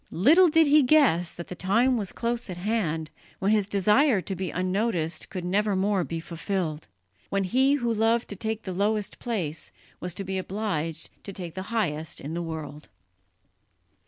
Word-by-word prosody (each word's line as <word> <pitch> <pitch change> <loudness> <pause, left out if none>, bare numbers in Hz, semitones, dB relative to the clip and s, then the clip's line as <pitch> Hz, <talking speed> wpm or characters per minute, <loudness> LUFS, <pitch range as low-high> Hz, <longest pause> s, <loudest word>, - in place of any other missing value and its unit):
Little 320 - +5
did 320 +1 +5
he 300 +1 +6
guess 250 - +4
that 170 - -7
the - - -6
time 230 +9 +2
was 205 -5 -2
close 235 -1 -2
at 180 - -5
hand 175 -6 -1 0.3
when 195 +2 +1
his 210 -2 +2
desire 210 +5 +4
to 190 +1 -4
be 185 0 -3
unnoticed 185 -2 -1
could 180 -2 -5
nevermore 195 0 +1
be 165 +2 -4
fulfilled, 165 -1 -3 0.4
when 195 0 0
he 260 +8 +3
who 240 -4 0
loved 225 +2 +2
to 205 - -5
take 220 +2 -3
the 185 - -4
lowest 205 +2 0
place 175 -10 -3 0.3
was 180 0 -4
to 195 - -4
be 190 0 -2
obliged 180 -5 -3
to 200 - -7
take 180 -4 -7
the 190 - -5
highest 160 -9 -1
in 150 +3 -6
the 170 - -2
world. 155 -3 -7
195 Hz, 175 wpm, -26 LUFS, 170-225 Hz, 0.4 s, he